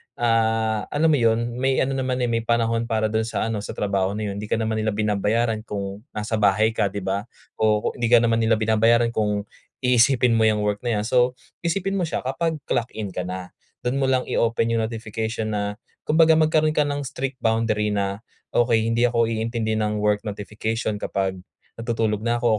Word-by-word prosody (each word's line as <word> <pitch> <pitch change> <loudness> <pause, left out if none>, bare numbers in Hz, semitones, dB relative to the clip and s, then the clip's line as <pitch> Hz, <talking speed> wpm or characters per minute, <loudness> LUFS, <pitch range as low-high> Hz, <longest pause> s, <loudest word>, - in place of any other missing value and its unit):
ah, 110 -2 +1
alam 160 +2 +2
mo 150 - +4
'yon, 115 +1 +1
may 135 0 +1
ano 135 - -1
naman, 130 -1 -1
eh, - - -2
may 115 - +1
panahon 115 0 +1
para 110 -2 0
doon 110 0 0
sa - - -2
ano, 110 - -2
sa 100 - -6
trabaho 100 -1 0
na 105 -1 -3
'yon. 100 - -6
Hindi 105 - -5
ka - - +1
naman 110 -1 -1
nila 110 -1 0
binabayaran 110 +2 0
kung 100 -1 -4 0.2
nasa 105 +1 -2
bahay 105 +1 +4
ka, 105 - +1
'di 100 +1 -5
ba? 100 +2 -2 0.3
O 105 -1 +2
ku - - +2
hindi 120 - +1
ka 120 -1 +7
naman 115 -1 +2
nila 110 0 +3
binabayaran 115 +2 +3
kung 105 -2 0 0.4
iisipin 125 0 +4
mo 110 - +4
'yang 105 -1 +2
work 105 0 0
na 120 -2 +1
'yan. - - -4
So, 125 0 +3 0.3
isipin 195 +3 0
mo 180 - +1
siya, - - -2
kapag 160 +6 -1
clock 120 -1 0
in 105 -2 -4
ka 90 0 -4
na, 90 0 -6 0.3
do'n 125 +2 0
mo 135 - +2
lang 130 -1 +2
i-open 115 0 +1
yung - - +1
notification 110 0 -4
na, 100 0 -2 0.3
kumbaga 160 +1 +5
magkaroon 155 0 +3
ka 150 - +4
ng 145 0 -2
strict 135 -1 -5
boundary 110 -2 +1
na, 100 0 -2 0.3
"Okey, 115 -2 +3
hindi 120 +1 +3
ako 115 -1 +2
iintindi 115 0 -2
ng 105 -1 0
work 105 0 +1
notification 105 +1 -3
kapag 95 -1 -1 0.5
natutulog 115 -3 0
na 120 +1 0
ako 120 - -4
115 Hz, 205 wpm, -23 LUFS, 105-120 Hz, 0.5 s, ka